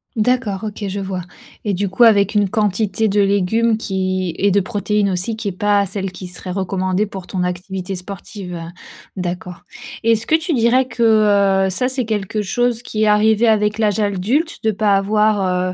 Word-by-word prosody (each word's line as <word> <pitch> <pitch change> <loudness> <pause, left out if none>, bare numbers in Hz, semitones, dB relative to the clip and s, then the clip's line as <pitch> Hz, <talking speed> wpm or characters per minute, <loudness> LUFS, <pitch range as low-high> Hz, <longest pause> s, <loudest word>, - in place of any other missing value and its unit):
D'accord, 220 -3 0
OK 210 -1 -5
je 200 +1 -4
vois. 190 -2 -4 0.4
Et 205 - 0
du 200 +2 -1
coup, 190 +6 +2
avec 205 -2 +5
une 205 -2 +2
quantité 210 +1 0
de 205 0 +2
légumes 205 +3 +2
qui 185 -4 -2
et 200 - +3
de 200 +1 +3
protéines 205 0 0
aussi, 185 +5 -2
qui 220 -2 -3
est - - -4
pas 205 +2 +1
celle 195 0 -4
qui 185 0 -9
serait 180 +1 -9
recommandée 185 +1 -1
pour 195 -3 -9
ton 185 -2 -2
activité 185 +1 -4
sportive. 180 -1 -7 0.6
D'accord. 180 0 -5 0.4
Et 230 - +3
est-ce 220 0 -2
que - - -2
tu 325 +1 -1
dirais 245 +2 +3
que, 210 -5 +3
heu, - - -1
ça 250 +7 0
c'est 255 -3 -1
quelque 210 -1 -2
chose 240 +4 0
qui 215 -3 -2
est 215 - +3
arrivé 215 +2 +4
avec 210 -1 +2
l'âge 215 -1 +1
adulte 215 - -1
de 220 - +2
pas 205 -1 +2
avoir, 195 -3 +1
205 Hz, 185 wpm, -19 LUFS, 190-220 Hz, 0.6 s, avec